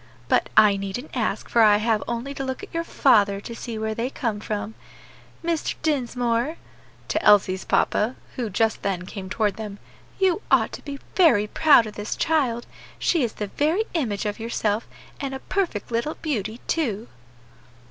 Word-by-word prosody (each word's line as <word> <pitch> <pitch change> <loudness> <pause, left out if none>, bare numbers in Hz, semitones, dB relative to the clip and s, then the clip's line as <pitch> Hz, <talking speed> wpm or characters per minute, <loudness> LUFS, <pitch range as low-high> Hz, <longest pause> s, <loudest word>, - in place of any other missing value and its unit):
But - - +2
I 210 -2 +7
needn't 200 +10 -5
ask, 220 -3 -1
for 235 - +3
I 210 -2 +7
have 220 0 +1
only 240 +4 -3
to 275 - -4
look 260 +8 -4
at 410 - -10
your 335 0 -1
father 205 -11 +3
to 235 - -7
see 230 -1 -6
where 220 0 -2
they 230 +3 -2
came 230 -6 -2
from. 210 0 -4 0.7
Mr. 335 -2 -1
Dinsmore" 245 -1 0 0.5
to - - 0
Elsie's 190 -3 +5
papa, 225 +5 +1 0.2
who 240 -4 -2
just 220 +3 +1
then 185 -2 -2
came 190 0 -7
toward 205 -1 0
them 210 -2 -6 0.4
"you 380 0 +2
ought - - +4
to - - -8
be 280 -1 -6 0.2
very 290 - +5
proud 280 +2 +5
of 215 - -7
this 210 +1 -4
child; 260 -7 +1 0.3
she 335 - +1
is 230 - -1
the 210 - -4
very 320 +9 +2
image 225 -12 -1
of 210 +2 -3
yourself, 225 -1 -1 0.3
and 275 -1 -3
a - - -5
perfect 330 - -2
little 235 +7 -1
beauty, 225 - -3
too." 235 -9 -1
230 Hz, 175 wpm, -24 LUFS, 210-280 Hz, 0.7 s, I